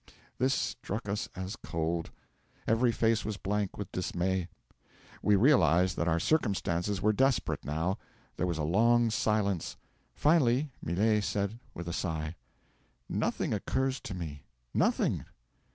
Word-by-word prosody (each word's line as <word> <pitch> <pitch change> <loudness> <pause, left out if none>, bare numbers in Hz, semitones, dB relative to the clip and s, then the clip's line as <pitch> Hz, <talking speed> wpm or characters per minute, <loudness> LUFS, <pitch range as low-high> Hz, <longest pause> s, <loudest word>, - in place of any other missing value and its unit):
'This 130 +2 +3
struck 105 +2 -3
us 105 +2 -2
as 95 +3 -4
cold. 85 -4 -2 0.6
Every 115 +2 +3
face 115 -1 +2
was 110 -2 -3
blank 100 0 -2
with 100 -3 -5
dismay. 90 0 -1 0.7
We 105 - +4
realised 95 - +4
that 85 - -1
our 85 0 +2
circumstances 100 - 0
were 110 +1 +4
desperate, 135 +2 +1
now. 80 +6 -1 0.4
There 90 - 0
was 85 -2 -1
a 80 - -1
long 115 +7 +4
silence. 105 -5 0 0.4
Finally, 145 -2 +3
Millet 105 +5 +2
said 100 +4 -1 0.2
with 85 0 -6
a 85 - -3
sigh: 80 -2 -2 0.7
'"Nothing - - -1
occurs 130 0 0
to 100 - -6
me 80 -5 -6 0.3
nothing. - - +2
100 Hz, 135 wpm, -30 LUFS, 85-115 Hz, 0.7 s, We